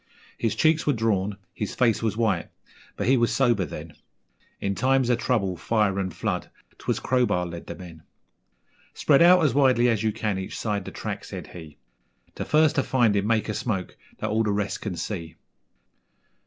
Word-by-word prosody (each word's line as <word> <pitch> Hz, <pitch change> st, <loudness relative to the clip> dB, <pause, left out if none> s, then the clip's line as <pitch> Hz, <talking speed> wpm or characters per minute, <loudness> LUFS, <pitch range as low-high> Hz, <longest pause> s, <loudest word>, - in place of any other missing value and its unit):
His 115 Hz, -, -1 dB
cheeks 160 Hz, 0 st, +2 dB
were 145 Hz, -, +4 dB
drawn, 105 Hz, -4 st, 0 dB, 0.2 s
his 105 Hz, -, -4 dB
face 115 Hz, -4 st, +2 dB
was 110 Hz, -2 st, -1 dB
white, 105 Hz, -7 st, 0 dB, 0.5 s
but -, -, -2 dB
he 130 Hz, +2 st, +4 dB
was 120 Hz, -1 st, +2 dB
sober 120 Hz, -8 st, +2 dB
then -, -, -8 dB, 0.7 s
In 100 Hz, -, -1 dB
times 130 Hz, +2 st, +2 dB
of 120 Hz, -, +1 dB
trouble, 100 Hz, -7 st, 0 dB
fire, 100 Hz, +2 st, 0 dB
and 95 Hz, -1 st, -2 dB
flood, -, -, -3 dB, 0.3 s
'twas -, -, -1 dB
Crowbar 125 Hz, -8 st, +1 dB
led 85 Hz, -1 st, -8 dB
the -, -, -6 dB
men. 85 Hz, -4 st, -11 dB, 0.9 s
'Spread 140 Hz, 0 st, +4 dB
out 175 Hz, -1 st, +7 dB
as 135 Hz, -, +2 dB
widely 130 Hz, -4 st, +4 dB
as 110 Hz, -3 st, +1 dB
you 110 Hz, -1 st, +1 dB
can 105 Hz, -3 st, -2 dB
each 95 Hz, -, -6 dB
side 105 Hz, -2 st, -2 dB
the -, -, -7 dB
track,' -, -, -5 dB
said -, -, -7 dB
he; 80 Hz, -4 st, -11 dB, 0.6 s
'The -, -, -5 dB
first 155 Hz, 0 st, +3 dB
to 135 Hz, -, +3 dB
find 120 Hz, -5 st, +2 dB
him 100 Hz, 0 st, +1 dB
make 115 Hz, -1 st, +1 dB
a 110 Hz, -, -2 dB
smoke 100 Hz, -5 st, -3 dB, 0.2 s
that -, -, -3 dB
all 110 Hz, +1 st, +2 dB
the 110 Hz, -2 st, +1 dB
rest 100 Hz, 0 st, -2 dB
can 100 Hz, -5 st, -4 dB
see.' 85 Hz, -1 st, -5 dB
110 Hz, 190 wpm, -25 LUFS, 95-125 Hz, 0.9 s, out